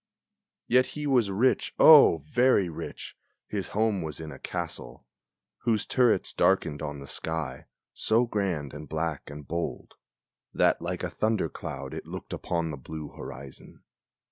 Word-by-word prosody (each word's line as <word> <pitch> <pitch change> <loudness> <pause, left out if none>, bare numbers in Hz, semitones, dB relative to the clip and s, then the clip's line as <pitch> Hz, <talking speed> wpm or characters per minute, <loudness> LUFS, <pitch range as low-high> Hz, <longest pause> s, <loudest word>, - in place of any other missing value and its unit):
Yet 130 +1 +4
he 150 - -3
was 125 -7 +3
rich, 110 +7 +1
O! 140 - +8
very 120 -2 +3
rich; 80 - -7 0.3
his 100 -3 -3
home 110 -2 0
was 80 -1 -5
in 80 -1 -7
a 70 - -10
castle, - - -6 0.5
Whose 110 -3 +1
turrets 125 -3 +2
darkened 75 - +2
on 75 -2 -4
the 70 - -9
sky, 75 -3 -4 0.3
so 115 +3 +2
grand 95 - -2
and 75 +1 -9
black 80 -2 -3
and 75 -1 -9
bold 85 0 -4 0.6
That - - +3
like - - -3
a - - -1
thunder 110 -6 0
cloud - - -7
it - - -7
looked - - -7
upon 85 -2 -2
the 75 - -6
blue 75 +3 -7
horizon. 65 0 -10
85 Hz, 150 wpm, -28 LUFS, 75-110 Hz, 0.6 s, O